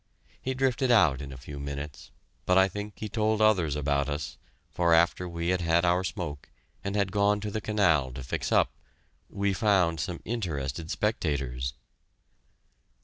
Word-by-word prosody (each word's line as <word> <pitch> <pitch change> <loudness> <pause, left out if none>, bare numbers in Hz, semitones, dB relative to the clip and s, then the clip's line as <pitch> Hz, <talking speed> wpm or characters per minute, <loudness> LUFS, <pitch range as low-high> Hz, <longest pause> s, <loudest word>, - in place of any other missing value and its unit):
He 130 0 -2
drifted 130 -1 +1
out 80 - +5
in 70 -1 -7
a 65 - -8
few 70 +2 -8
minutes, 70 +1 -6 0.4
but 90 - +4
I 95 0 +6
think 105 +2 -6
he 110 - -4
told 110 0 0
others 95 -9 +3
about 70 -1 0
us, 75 +1 -4 0.3
for 85 -1 +3
after 85 +2 +2
we 85 0 -2
had 90 -1 +1
had 85 +1 +3
our 90 +1 +3
smoke, 75 -5 -5 0.3
and 100 +1 -3
had 100 -2 +1
gone 100 +1 +2
to 105 0 -4
the 110 - -3
canal 90 -12 +2
to 65 0 -7
fix 65 - -3
up, - - +4 0.6
we 100 0 0
found 95 -6 +2
some 90 +1 -3
interested 80 - -3
spectators. 65 - -1
90 Hz, 165 wpm, -28 LUFS, 75-105 Hz, 0.6 s, I